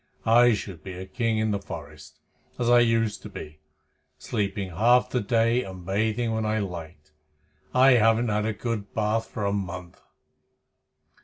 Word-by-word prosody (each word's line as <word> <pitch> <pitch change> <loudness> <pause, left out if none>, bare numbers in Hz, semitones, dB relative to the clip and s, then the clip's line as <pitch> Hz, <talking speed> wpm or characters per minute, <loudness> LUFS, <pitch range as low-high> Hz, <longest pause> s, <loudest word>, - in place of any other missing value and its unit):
I 120 +1 +5
should 95 -4 -8
be 95 - -7
a 90 +1 -7
king 115 +3 -1
in 110 0 +1
the 100 - -1
forest, - - -10 0.4
as 120 0 +1
I 120 - +7
used 115 -2 +1
to - - -9
be, 75 0 -9 0.6
sleeping 100 -2 -3
half 120 +8 +3
the 125 - 0
day 115 +2 +2
and 95 -2 -9
bathing 110 +4 0
when 110 0 -1
I 110 0 0
liked. 85 -6 -6 0.6
I 130 +1 +6
haven't 115 0 +4
had 105 0 0
a 110 - -1
good 105 -2 -5
bath 110 +1 0
for 105 - -4
a 100 - 0
month." 90 -3 -5
110 Hz, 165 wpm, -26 LUFS, 95-115 Hz, 0.6 s, I